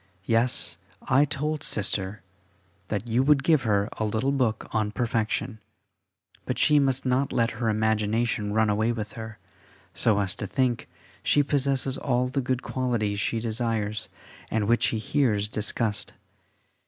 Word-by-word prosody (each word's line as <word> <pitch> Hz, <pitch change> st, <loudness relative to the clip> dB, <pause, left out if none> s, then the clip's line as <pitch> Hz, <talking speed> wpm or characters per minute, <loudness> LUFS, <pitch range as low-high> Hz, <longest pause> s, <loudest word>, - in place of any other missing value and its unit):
Yes, 115 Hz, +3 st, 0 dB, 0.3 s
I 140 Hz, +3 st, +4 dB
told 150 Hz, +2 st, -2 dB
Sister 100 Hz, -1 st, 0 dB, 0.6 s
that 105 Hz, +3 st, -3 dB
you 120 Hz, +2 st, +2 dB
would 140 Hz, 0 st, +4 dB
give 155 Hz, -1 st, +4 dB
her 105 Hz, -3 st, +1 dB
a -, -, 0 dB
little 110 Hz, +5 st, 0 dB
book 125 Hz, -6 st, 0 dB
on 110 Hz, -1 st, +1 dB
perfection, 110 Hz, -2 st, -1 dB, 0.8 s
but -, -, -3 dB
she 150 Hz, -1 st, +5 dB
must 135 Hz, -2 st, +1 dB
not 130 Hz, +2 st, +1 dB
let 115 Hz, 0 st, +1 dB
her 115 Hz, 0 st, -1 dB
imagination 110 Hz, 0 st, 0 dB
run 110 Hz, +1 st, +3 dB
away 110 Hz, +2 st, +1 dB
with 110 Hz, -2 st, -5 dB
her, 110 Hz, -1 st, -8 dB, 0.6 s
so 110 Hz, -3 st, +2 dB
as 95 Hz, -2 st, 0 dB
to 105 Hz, -, -3 dB
think 125 Hz, +2 st, 0 dB, 0.3 s
she 145 Hz, -, +3 dB
possesses 135 Hz, -2 st, 0 dB
all 125 Hz, -1 st, +1 dB
the 135 Hz, +1 st, -1 dB
good 130 Hz, 0 st, -1 dB
qualities 115 Hz, -6 st, -1 dB
she 115 Hz, -, 0 dB
desires 110 Hz, -2 st, -2 dB, 0.4 s
and 110 Hz, -2 st, 0 dB
which 120 Hz, +1 st, +3 dB
she 115 Hz, -, +2 dB
hears 110 Hz, -3 st, +1 dB
discussed. 105 Hz, 0 st, -2 dB
115 Hz, 150 wpm, -26 LUFS, 105-130 Hz, 0.8 s, she